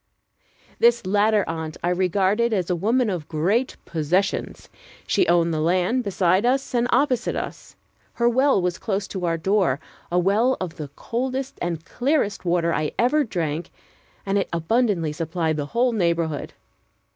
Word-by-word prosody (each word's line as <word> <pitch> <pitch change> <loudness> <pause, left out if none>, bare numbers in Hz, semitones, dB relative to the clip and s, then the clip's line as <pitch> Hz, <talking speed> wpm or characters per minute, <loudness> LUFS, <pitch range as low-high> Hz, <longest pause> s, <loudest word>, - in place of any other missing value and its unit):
This 235 -2 +4
latter 210 +2 +2
aunt 160 -1 -4
I 175 - +1
regarded 190 +5 +1
as 185 -3 0
a - - +2
woman 230 +8 +1
of 175 -7 -3
great 190 +12 0
possessions. 170 +5 -1 0.4
She 370 - +2
owned 170 -1 +3
the 155 - -1
land 180 +10 +1
beside 190 -1 +2
us 260 +3 0
and 240 0 +2
opposite 255 -1 +1
us. - - -6 0.4
Her 235 - +1
well 260 0 +3
was 180 -1 -1
close 200 -2 -2
to 185 -3 -4
our 165 0 0
door, 185 -5 +1 0.3
a 175 - +1
well 210 +8 +2
of 180 -3 -5
the 150 - -5
coldest 260 +3 -3
and 165 -2 -3
clearest 245 -7 -1
water 170 -1 +1
I 155 -1 -1
ever 275 +6 +3
drank, 170 - -3 0.6
and 200 0 +1
it - - -2
abundantly 170 -2 +1
supplied 165 0 -1
the 145 -1 -3
whole 245 - +1
neighborhood. 170 -7 -1
190 Hz, 155 wpm, -23 LUFS, 170-235 Hz, 0.6 s, This